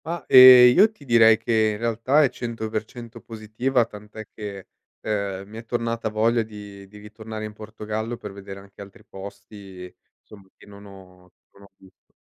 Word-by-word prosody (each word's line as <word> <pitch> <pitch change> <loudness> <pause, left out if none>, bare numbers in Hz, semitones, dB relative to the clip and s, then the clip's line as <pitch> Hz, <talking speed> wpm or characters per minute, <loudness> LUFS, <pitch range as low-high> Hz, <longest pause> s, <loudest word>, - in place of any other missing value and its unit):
Ma, 170 +2 -6
ehm, 125 -1 +9
io 210 +4 +5
ti 150 -10 -19
direi 115 -3 +5
che 110 -1 0
in - - -6
realtà 115 +6 +1
è 135 - +2
100% 115 0 -7
positiva, 115 +3 -2
tant'è 105 0 -12
che, 100 -3 -9 0.3
ehm, 100 -2 -4
mi 110 +2 -12
è 115 - -13
tornata 115 -1 -3
voglia 115 +2 0
di 105 -2 -11
di 105 +2 -16
ritornare 110 +1 -9
in 105 - -9
Portogallo, 110 +2 -7
per 105 - -9
vedere 100 0 -11
anche 100 0 -16
altri 100 -1 -14
posti, 95 -1 -12 0.3
insomma, 100 -2 -17
che - - -19
non 100 0 -15
ho 90 -2 -17 0.2
non 100 - -22
ho 100 - -19
visto. 95 -1 -24
110 Hz, 170 wpm, -22 LUFS, 100-115 Hz, 0.3 s, ehm